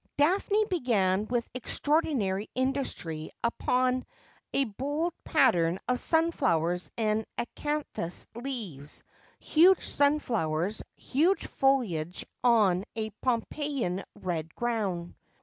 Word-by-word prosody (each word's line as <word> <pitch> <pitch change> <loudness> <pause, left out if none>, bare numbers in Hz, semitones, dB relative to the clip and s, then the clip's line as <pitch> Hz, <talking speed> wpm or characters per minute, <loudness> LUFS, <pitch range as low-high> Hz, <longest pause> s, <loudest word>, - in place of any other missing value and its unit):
Daphne 395 +8 +3
began 215 - +1
with 240 -1 -1
extraordinary 255 - 0
industry 255 - -2
upon 255 +2 +1 0.5
a 275 - +2
bold 290 - -2
pattern 180 - +3
of 250 0 +1
sunflowers 180 - +1
and 220 -1 +1
acanthus 290 - -3
leaves, 220 - -6 0.4
huge 355 +4 +5
sunflowers, 220 - +1
huge 330 +9 +1
foliage, 195 -12 0 0.2
on 210 -7 +4
a 220 -1 -3
Pompeian 250 -5 -1
red 165 -3 -4
ground. 205 -8 -2
235 Hz, 90 wpm, -29 LUFS, 185-285 Hz, 0.5 s, huge